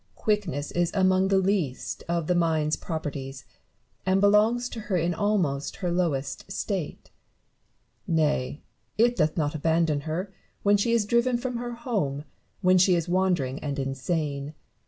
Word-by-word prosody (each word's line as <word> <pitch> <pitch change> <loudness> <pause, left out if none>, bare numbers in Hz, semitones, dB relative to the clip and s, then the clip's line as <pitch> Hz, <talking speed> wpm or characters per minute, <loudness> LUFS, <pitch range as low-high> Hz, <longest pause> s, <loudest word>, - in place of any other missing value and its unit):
Barrow. - - -24
Quickness 190 -9 0
is 175 -1 +1
among 190 0 +3
the 195 0 +3
least 190 -9 -1
of 170 -1 0
the 180 - +2
mind's 160 -3 +1
properties, 140 -5 -5 0.6
and 190 +1 +2
belongs 215 +4 +4
to 230 - -7
her 210 -3 -1
in 170 +1 +1
almost 170 -8 0
her 180 -2 -2
lowest 165 -2 -2
state: 190 -5 -4 1.0
nay, 150 -3 0 0.3
it 240 +2 +4
doth 155 -5 +1
not 150 -2 0
abandon 160 -1 +1
her 185 +5 -3 0.3
when 205 0 +5
she 205 +3 +1
is 230 -3 +2
driven 235 +3 +2
from 250 0 -3
her 240 0 -4
home, 200 - -2 0.4
when 185 0 +5
she 185 0 +5
is 170 0 -1
wandering 175 -7 +1
and 145 -1 -4
insane. 140 +2 -2
175 Hz, 155 wpm, -26 LUFS, 150-205 Hz, 1.0 s, when